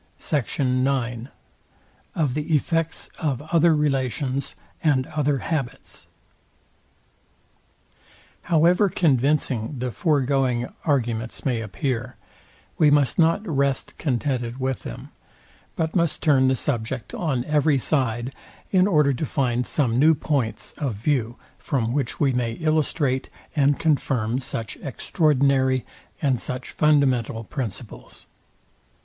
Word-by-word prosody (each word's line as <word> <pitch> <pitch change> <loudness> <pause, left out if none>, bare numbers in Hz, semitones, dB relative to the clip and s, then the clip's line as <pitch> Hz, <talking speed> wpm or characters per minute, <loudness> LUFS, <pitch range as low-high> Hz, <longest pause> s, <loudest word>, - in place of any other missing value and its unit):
SECT. 145 -3 -2
IX. 130 -2 0 0.9
OF 150 -6 +1
THE 150 +3 0
EFFECTS 165 +2 -1
OF 145 -7 -1
OTHER 165 -1 +5
RELATIONS 135 -2 -1 0.3
AND 140 -5 +3
OTHER 145 -2 0
HABITS. 135 -3 -5 2.4
However 175 +5 +4
convincing 140 -5 +1
the 125 0 -3
foregoing 130 - +1
arguments 120 -6 -1
may 120 -4 0
appear, 120 +3 -3 0.6
we 155 - +6
must 145 0 +3
not 165 +6 +3
rest 140 -4 0
contented 125 -3 -1
with 130 0 -1
them, - - -8 0.7
but 160 -1 -2
must 170 -4 0
turn 135 -4 +4
the 130 - +3
subject 120 -2 -3
on 135 -8 -1
every 150 -1 +2
side, 130 -2 0 0.4
in 185 0 +4
order 150 -7 +3
to 135 - -4
find 125 -3 0
some 125 -5 +1
new 155 +3 +6
points 120 -9 -2
of 135 -7 -2
view, 120 0 -1 0.2
from 120 -4 -1
which 140 0 -2
we 140 -3 +2
may 120 -2 -1
illustrate 155 -3 0 0.3
and 145 -1 +3
confirm 130 -6 0
such 115 -4 -3
extraordinary, 135 -3 +1 0.4
and 130 -4 +2
such 125 +2 -6
fundamental 130 -7 +2
principles. 115 -4 -7
135 Hz, 115 wpm, -24 LUFS, 125-150 Hz, 2.4 s, we